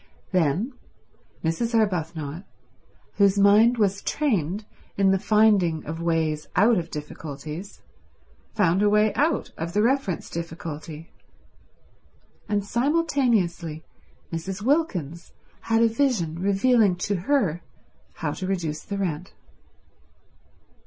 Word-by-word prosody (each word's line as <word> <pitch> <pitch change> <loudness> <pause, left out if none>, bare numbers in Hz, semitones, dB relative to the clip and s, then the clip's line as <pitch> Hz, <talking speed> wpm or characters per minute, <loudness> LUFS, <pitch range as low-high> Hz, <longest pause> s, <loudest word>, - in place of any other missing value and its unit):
Then 185 - +1 0.7
Mrs. 230 +9 -1
Arbuthnot, 165 -6 -1 0.7
whose 200 -1 +4
mind 210 +4 +5
was 200 -2 +1
trained 210 - -1 0.3
in 195 -1 +4
the 195 - +2
finding 200 -7 +3
of 160 +2 -5
ways 160 -2 0
out 215 +1 +4
of 165 -1 -6
difficulties, 150 +4 -8 0.7
found 185 -2 +3
a 205 - +4
way 210 0 +3
out 310 +4 0
of 165 +1 -4
the 210 +2 +2
reference 245 -7 0
difficulty; 165 -1 -7 1.4
and 205 -1 0
simultaneously 235 - 0 0.5
Mrs. 185 +5 -4
Wilkins 185 - -1 0.4
had 225 0 +4
a - - +6
vision 225 - 0
revealing 200 +1 +3
to 190 +3 -2
her 185 - 0 0.5
how - - -3
to 185 - -5
reduce 165 -6 -2
the 200 - -5
rent. 180 -2 -3
195 Hz, 110 wpm, -25 LUFS, 165-220 Hz, 1.4 s, a